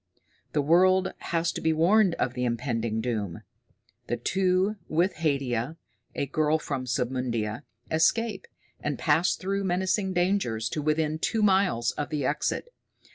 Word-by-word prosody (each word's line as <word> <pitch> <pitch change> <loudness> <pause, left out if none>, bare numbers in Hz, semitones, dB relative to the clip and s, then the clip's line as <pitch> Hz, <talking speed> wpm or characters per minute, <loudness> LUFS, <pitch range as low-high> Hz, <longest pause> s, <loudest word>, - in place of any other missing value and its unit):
The 150 - +1
world 185 +4 +4 0.2
has 165 0 +1
to - - -6
be 160 - +2
warned 180 +3 +4
of 125 0 -1
the 125 0 -3
impending 115 -2 -1
doom. 105 -8 -3 0.6
The 120 - -1
two, 190 - +1
with 170 +4 +1
Haidia, 140 -2 -1 0.4
a - - -1
girl 150 +2 +1
of 160 - -1
Submundia, 125 -4 -2 0.3
escape, 195 +6 +1 0.3
and 150 -2 -3
pass 160 +3 +2
through 195 +1 -2
menacing 190 +1 0
dangers 175 - 0
to 155 - -3
within 155 +1 0
two 220 +5 0
miles 190 - +3
of 145 - -4
the 150 -4 -2
exit. 150 - -1
155 Hz, 140 wpm, -27 LUFS, 125-185 Hz, 0.6 s, world